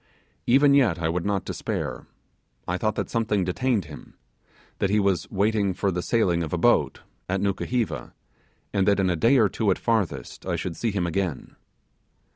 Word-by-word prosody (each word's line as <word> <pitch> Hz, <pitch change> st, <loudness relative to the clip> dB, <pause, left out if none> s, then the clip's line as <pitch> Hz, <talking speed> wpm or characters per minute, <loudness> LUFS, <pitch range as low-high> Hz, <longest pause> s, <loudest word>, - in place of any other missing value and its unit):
Even 140 Hz, +3 st, +5 dB
yet 125 Hz, -, +4 dB
I 80 Hz, -1 st, -1 dB
would 85 Hz, +3 st, -2 dB
not 100 Hz, -2 st, -1 dB
despair; -, -, -4 dB, 0.6 s
I 90 Hz, +1 st, -1 dB
thought 110 Hz, -1 st, 0 dB
that -, -, -3 dB
something 110 Hz, -4 st, 0 dB
detained 105 Hz, +2 st, 0 dB
him 75 Hz, -1 st, -12 dB, 0.6 s
that 100 Hz, -, +1 dB
he 105 Hz, +1 st, +3 dB
was 100 Hz, -3 st, 0 dB
waiting 100 Hz, -1 st, +1 dB
for 100 Hz, +1 st, 0 dB
the 90 Hz, 0 st, -2 dB
sailing 90 Hz, -6 st, +1 dB
of 80 Hz, -3 st, -4 dB
a 90 Hz, -, 0 dB
boat, 85 Hz, -, +2 dB, 0.3 s
at 95 Hz, +1 st, 0 dB
Nukuheva, 110 Hz, +4 st, -2 dB, 0.6 s
and 95 Hz, -2 st, +1 dB
that 100 Hz, -1 st, +3 dB
in 95 Hz, -2 st, +2 dB
a -, -, +1 dB
day 115 Hz, -, +4 dB
or 110 Hz, -4 st, +5 dB
two 105 Hz, +2 st, -1 dB
at 95 Hz, -, +2 dB
farthest 110 Hz, -7 st, -2 dB
I -, -, -2 dB
should 90 Hz, -3 st, -4 dB
see 115 Hz, -, -1 dB
him 100 Hz, -4 st, -1 dB
again. 85 Hz, -3 st, -3 dB
100 Hz, 185 wpm, -25 LUFS, 90-110 Hz, 0.6 s, Even